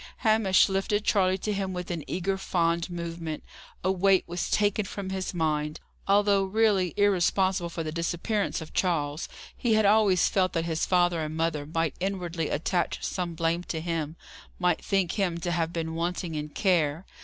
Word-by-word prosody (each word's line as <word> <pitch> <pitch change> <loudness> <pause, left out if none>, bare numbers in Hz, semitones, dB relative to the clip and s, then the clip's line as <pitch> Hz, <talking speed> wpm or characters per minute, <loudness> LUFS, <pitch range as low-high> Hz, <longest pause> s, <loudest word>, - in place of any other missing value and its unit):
Hamish 215 -4 +5
lifted 195 +2 0
Charley 190 -2 +3
to 210 +2 -2
him 195 -1 -2
with 180 0 -5
an 165 -3 -3
eager, 185 +2 -1
fond 170 -2 0
movement. 170 -2 -5 0.4
A 185 - +2
weight 190 0 +3
was 175 +1 -3
taken 205 0 +1
from 190 0 -5
his 190 -1 -2
mind. 155 -3 -1 0.3
Although 200 0 +4
really 195 -3 +2
irresponsible 190 -2 +2
for 165 -1 -4
the 155 - -4
disappearance 175 +5 -1
of 160 - -9
Charles, 155 -4 0 0.3
he 230 -3 +1
had 215 -1 +3
always 200 -3 +4
felt 185 -2 +1
that 165 -1 0
his 160 -1 -1
father 175 -2 +2
and 155 0 -4
mother 160 -3 -1
might 165 -1 -1
inwardly 175 -4 -2
attach 175 +4 -1
some 175 -3 -3
blame 165 +1 0
to 160 - -3
him 160 -2 -3 0.4
might 180 -2 +1
think 195 -3 +1
him 185 -5 0
to 175 +1 -3
have 165 -1 0
been 160 -1 -3
wanting 170 0 -2
in 150 0 -4
care. 165 -2 +1
175 Hz, 175 wpm, -27 LUFS, 165-195 Hz, 0.4 s, Hamish